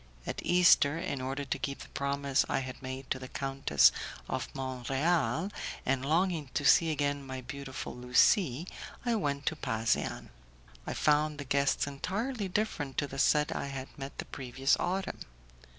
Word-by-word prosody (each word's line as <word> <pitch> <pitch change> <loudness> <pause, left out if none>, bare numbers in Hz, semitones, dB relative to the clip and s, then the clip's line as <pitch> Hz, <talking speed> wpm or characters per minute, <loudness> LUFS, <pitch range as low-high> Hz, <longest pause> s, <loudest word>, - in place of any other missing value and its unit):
At - - -4
Easter, 175 -4 +5
in 140 -5 -3
order 135 +2 -3
to 130 - -2
keep 140 -1 -3
the - - -14
promise 140 -1 0
I - - +1
had 130 0 -7
made 130 0 -6
to - - 0
the 130 - -7
Countess 135 - +3 0.4
of - - -2
Mont 130 -2 -4
Real, 160 - +1 0.3
and 135 0 +1
longing 160 0 +1
to 145 - 0
see 165 +4 +6
again 145 -2 0
my 130 -1 -6
beautiful 135 +1 -6
Lucie, 125 - +3 0.4
I 240 - +2
went 145 -10 -1
to 160 - +1
Pasean. 110 - -1 0.6
I - - -3
found 150 0 +2
the 145 - -6
guests 140 +1 +2
entirely 200 - -3
different 180 -9 -2
to - - +2
the 135 -1 -7
set 150 +2 +3
I - - -2
had 135 -1 -7
met 135 0 -7
the - - -4
previous 135 +1 0
autumn. 190 +2 -2
140 Hz, 165 wpm, -31 LUFS, 130-155 Hz, 0.6 s, see